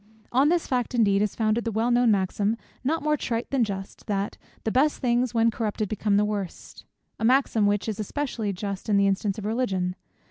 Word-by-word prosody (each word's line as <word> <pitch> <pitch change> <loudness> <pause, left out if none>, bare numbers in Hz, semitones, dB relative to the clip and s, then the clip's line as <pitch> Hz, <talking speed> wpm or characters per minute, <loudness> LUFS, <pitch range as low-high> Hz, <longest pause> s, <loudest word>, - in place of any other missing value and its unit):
On 270 +4 +4
this 345 0 +2
fact 250 -1 -1
indeed 200 -4 +3
is 210 -1 0
founded 220 +1 +1
the 230 - -2
well 225 +3 +1
known 240 0 +4
maxim, 205 +2 +1 0.3
not 310 +5 0
more 300 0 +2
trite 235 -5 -3
than 270 -3 +3
just, 195 -1 -6
that 200 -1 -1 0.3
"the 220 - 0
best 290 +5 +3
things 245 -1 0
when 230 0 +4
corrupted 215 -2 -2
become 210 -1 +1
the 210 - +3
worst;" 205 -4 -5 0.3
a - - -4
maxim 235 -3 +3
which 205 +1 0
is 215 -2 -3
especially 225 -2 -2
just 200 +2 -5
in 205 - +4
the 200 - +4
instance 195 +1 0
of 210 - -5
Religion. 195 -6 -1
220 Hz, 205 wpm, -26 LUFS, 200-245 Hz, 0.3 s, On